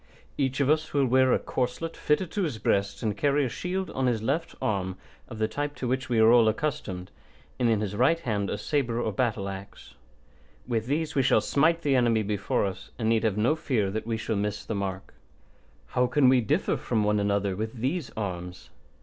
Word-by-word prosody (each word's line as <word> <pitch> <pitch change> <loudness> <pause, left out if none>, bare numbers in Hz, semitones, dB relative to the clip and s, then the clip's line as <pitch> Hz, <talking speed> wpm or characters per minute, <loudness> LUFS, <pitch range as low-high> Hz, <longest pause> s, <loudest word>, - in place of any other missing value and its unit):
Each 135 -1 -1
of 140 - +2
us 155 +1 +1
will 140 -1 +4
wear 130 +1 +4
a - - +4
corslet 130 +6 -3
fitted 160 +4 0
to 205 - -1
his 150 - -1
breast 100 0 0
and 105 -3 0
carry 140 +4 +2
a - - -2
shield 185 +8 -3
on 130 -1 0
his 115 -3 0
left 165 +8 -1
arm 95 -3 -1 0.3
of - - -8
the 110 0 +1
type 145 +6 -3
to 125 - -4
which 130 +1 -1
we 120 - +1
are 110 +1 +6
all 120 -2 +6
accustomed, 105 -7 -2 0.5
and 120 -2 +3
in 110 -2 +2
his 105 -1 -3
right 135 +9 +3
hand 105 -9 -2
a - - -2
sabre 120 0 -1
or 115 - 0
a - - -3
battle 105 -2 -1
axe. 100 0 -9 0.7
With 115 -2 -1
these 155 +3 -1
we 135 - +3
shall 130 - +4
smite 165 +4 +2
the 140 -2 +2
enemy 115 -3 +3
before 105 0 0
us, 95 0 -6
and 110 -1 0
need 115 0 +2
have 110 -3 +1
no 120 +9 +3
fear 110 -11 0
that 110 +2 -4
we 115 -1 -1
shall 110 0 -2
miss 105 0 -2
the - - -3
mark. 95 -2 -4 0.8
How 125 0 +2
can 135 -1 +4
we 130 -1 +5
differ 110 - 0
from 110 -3 0
one 105 0 +2
another 100 -1 0
with 110 +4 -4
these 135 +6 -2
arms? 90 -3 -5
115 Hz, 220 wpm, -27 LUFS, 105-135 Hz, 0.8 s, are